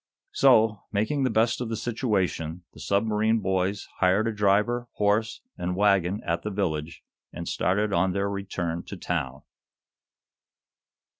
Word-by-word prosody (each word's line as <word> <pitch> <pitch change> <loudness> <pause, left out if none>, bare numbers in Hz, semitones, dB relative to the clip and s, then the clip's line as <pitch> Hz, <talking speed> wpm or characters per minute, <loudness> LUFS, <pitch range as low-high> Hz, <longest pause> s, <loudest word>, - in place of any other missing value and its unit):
So, 110 -6 +4
making 110 +8 0
the - - +2
best 115 +2 +1
of 120 - -3
the 115 - -2
situation, 95 -8 -2
the - - -14
submarine 110 +2 +1
boys 95 0 -1
hired 95 +4 +3
a - - 0
driver, 105 +4 +1
horse 105 +2 0 0.2
and 90 +1 -2
wagon 100 -1 +2
at 85 0 -1
the 105 - -3
village, 85 -6 -3 0.3
and - - -7
started 105 +2 0
on 95 +1 +2
their 100 +1 0
return 95 -4 -3
to 100 - -8
town. 65 -8 -3
100 Hz, 140 wpm, -26 LUFS, 90-110 Hz, 0.3 s, So